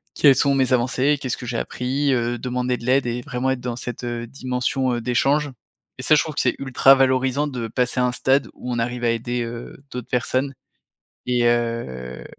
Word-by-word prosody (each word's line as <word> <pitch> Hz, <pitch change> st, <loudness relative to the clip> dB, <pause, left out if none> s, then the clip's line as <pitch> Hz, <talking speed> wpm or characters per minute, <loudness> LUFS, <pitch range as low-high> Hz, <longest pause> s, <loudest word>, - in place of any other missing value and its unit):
quelles 140 Hz, -3 st, +6 dB
sont 140 Hz, +1 st, +2 dB
mes 130 Hz, -1 st, +2 dB
avancées, 130 Hz, +4 st, +2 dB
qu'est-ce 130 Hz, -2 st, -2 dB
que -, -, -8 dB
j'ai 120 Hz, -1 st, -3 dB
appris, 135 Hz, +4 st, -1 dB
heu, 120 Hz, -1 st, 0 dB
demander 125 Hz, 0 st, -1 dB
de 120 Hz, -, -10 dB
l'aide 130 Hz, +1 st, +3 dB
et 120 Hz, +1 st, -2 dB
vraiment 130 Hz, -2 st, -1 dB
être 130 Hz, -, -1 dB
dans 120 Hz, -1 st, -3 dB
cette, 120 Hz, 0 st, -6 dB
heu, 120 Hz, -1 st, -3 dB
dimension, 130 Hz, 0 st, -1 dB
heu, 120 Hz, -, -3 dB
d'échange 140 Hz, +5 st, +1 dB, 0.5 s
et -, -, -3 dB
ça 155 Hz, -, +5 dB
je 150 Hz, -, +4 dB
trouve 155 Hz, -, -6 dB
que -, -, -1 dB
c'est 125 Hz, -, +1 dB
ultra 135 Hz, 0 st, +5 dB
valorisant 130 Hz, +1 st, +2 dB
de 125 Hz, -5 st, -4 dB
passer 125 Hz, +2 st, -1 dB
à 125 Hz, -, +3 dB
un 125 Hz, -, 0 dB
stade 135 Hz, +3 st, +2 dB
où 125 Hz, -, -6 dB
on 120 Hz, -, -1 dB
arrive 120 Hz, +1 st, -2 dB
à 120 Hz, -, +3 dB
aider, 120 Hz, +1 st, -2 dB
heu, 120 Hz, +3 st, -8 dB
d'autres 125 Hz, -2 st, -6 dB
personnes 130 Hz, +2 st, 0 dB, 0.7 s
et 125 Hz, -1 st, +1 dB
heu, 115 Hz, -, -1 dB
125 Hz, 215 wpm, -22 LUFS, 120-135 Hz, 0.7 s, quelles